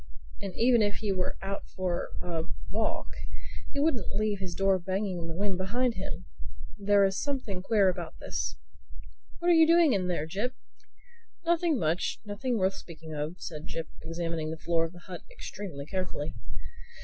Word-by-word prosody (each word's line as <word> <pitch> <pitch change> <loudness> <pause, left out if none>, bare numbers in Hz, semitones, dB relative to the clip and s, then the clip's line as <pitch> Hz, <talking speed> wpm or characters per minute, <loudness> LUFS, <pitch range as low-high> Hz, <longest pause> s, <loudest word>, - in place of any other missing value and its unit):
"And 195 -2 -4
even 235 0 +6
if 205 -1 +3
he 210 -3 -1
were 185 -1 0
out 195 +1 -3
for 180 -2 -1
a 165 -2 -1 0.3
walk - - 0 0.6
he 285 - -2
wouldn't 280 -8 +2
leave 210 -1 +1
his 185 -3 -4
door 195 0 +4
banging 190 +1 -1
in 165 - -4
the 165 - -4
wind 195 0 0
behind 240 +6 +2
him. 185 -2 -5 0.5
There 200 0 +6
is 195 0 +1
something 255 -10 -1
queer 205 0 +4
about 175 -3 -1
this—What 65 - -6
are - - +8
you 325 -1 +8
doing 335 -4 +7
in 185 -3 +2
there, 170 -4 0
Jip?" 205 +10 -1 0.9
"Nothing 335 -2 +4
much—nothing 205 +8 0
worth 190 -1 +3
speaking 160 -3 -9
of," 150 +3 -2
said 155 -2 -6
Jip 165 -1 -4
examining 165 -1 -2
the 160 - -3
floor 165 0 +2
of 165 - -6
the 175 - -13
hut 185 -2 -6
extremely 195 - -6
carefully. 185 -3 -2
190 Hz, 165 wpm, -30 LUFS, 165-215 Hz, 0.9 s, are